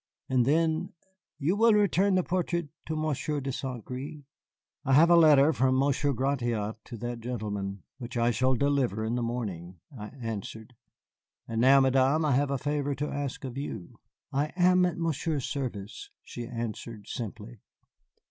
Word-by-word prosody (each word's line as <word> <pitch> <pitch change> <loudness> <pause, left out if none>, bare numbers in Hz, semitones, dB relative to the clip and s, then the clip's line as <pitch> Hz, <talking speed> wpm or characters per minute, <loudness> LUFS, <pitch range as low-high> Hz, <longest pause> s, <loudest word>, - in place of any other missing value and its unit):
And 130 -2 +2
then, 160 +3 +1 0.4
"You 155 +6 +1
will 225 +1 +5
return 200 -1 +3
the 185 - +2
portrait 170 -3 -1 0.2
to 160 - -2
Monsieur 155 -1 -1
de 135 0 -3
Saint 125 -3 -5
Gré?" 145 +4 -7 0.6
"I 135 - +1
have 165 +5 +6
a - - +8
letter 155 -2 +6
from 130 -1 +2
Monsieur 140 +1 +2
Gratiot 120 -5 -1
to 120 - -8
that 120 +1 -4
gentleman, 105 -5 -4 0.2
which 120 -1 -6
I 120 +1 +3
shall 130 +3 +2
deliver 130 -6 +1
in 110 - -1
the 120 - -1
morning," 95 -8 -4 0.2
I 105 -3 -7
answered. 110 +1 -6 0.7
"And 115 0 -1
now, 135 +2 +7
Madame, 135 +4 +3
I 150 - +2
have 140 +2 +2
a 140 - 0
favor 145 +1 -1
to 150 +2 -3
ask 140 -2 -4
of 130 +1 -5
you." 110 -10 -7 0.3
"I 140 +2 +1
am 180 0 +4
at 175 - -4
Monsieur's 160 -4 -1
service," 110 -8 -5
she 120 -1 -7
answered 115 -2 -6
simply. 115 0 -7
130 Hz, 165 wpm, -28 LUFS, 115-150 Hz, 0.7 s, a